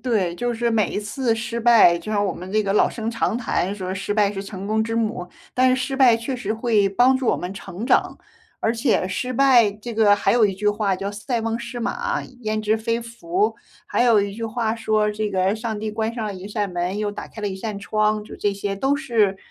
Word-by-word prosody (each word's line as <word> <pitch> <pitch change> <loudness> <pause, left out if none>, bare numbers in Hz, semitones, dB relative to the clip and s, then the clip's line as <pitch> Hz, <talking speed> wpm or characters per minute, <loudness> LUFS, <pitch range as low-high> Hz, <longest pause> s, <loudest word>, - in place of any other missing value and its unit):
对。 200 -9 0
就 240 +6 -2
是 235 +1 -1
每 215 -4 +2
一 - - -2
次 225 +3 -1
失 235 +1 -4
败， 225 -7 +6
就 195 +6 -7
像 205 -1 +1
我 190 - 0
们 180 +2 -9
这 215 +1 +2
个 195 -1 -1
老 - - +4
生 225 -1 -4
常 230 0 -1
谈 205 -5 -1
说 185 -2 -4
失 195 +2 -3
败 205 -1 +3
是 195 -1 -5
成 195 -1 -7
功 220 +1 +1
之 225 +1 -3
母， 215 -5 -2 0.3
但 255 0 +4
是 255 - +3
失 270 - -3
败 250 -4 +6
确 235 +3 -4
实 215 -4 -3
会 220 -3 +2
帮 245 +7 +4
助 260 -2 -2
我 - - +3
们 180 +1 -5
成 195 +3 -7
长。 - - +2 0.4
而 225 - +1
且 225 -5 +1
失 250 +7 -3
败 245 -5 +5
这 215 +3 -8
个 215 -2 +5
还 205 - +1
有 230 -3 +5
一 195 - -3
句 210 +2 0
话 205 -2 +1
叫 195 +1 -4
“塞 210 +4 -3
翁 225 +1 -2
失 235 +1 -6
马， 475 - -2 0.2
焉 215 -2 -1
之 215 +1 +1
非 230 +1 -1
福”。 335 - -1 0.3
还 - - +1
有 230 -4 +5
一 200 0 -3
句 230 - -5
话 225 0 -1
说 215 -2 +1
这 210 0 -2
个 190 +1 +1
“上 220 -1 -4
帝 215 0 -3
关 220 +1 -2
上 225 -3 -3
了 205 - -4
一 185 +1 -8
扇 205 -2 -2
门， 175 +3 -2
又 210 -1 -1
打 205 - -7
开 220 - -10
了 205 - -1
一 190 - -5
扇 205 +1 -5
窗”。 215 +1 0
就 - - -10
这 205 - 0
些 200 0 -3
都 270 +7 +1
是， 225 -8 +1
215 Hz, 270 characters per minute, -22 LUFS, 200-235 Hz, 0.4 s, 败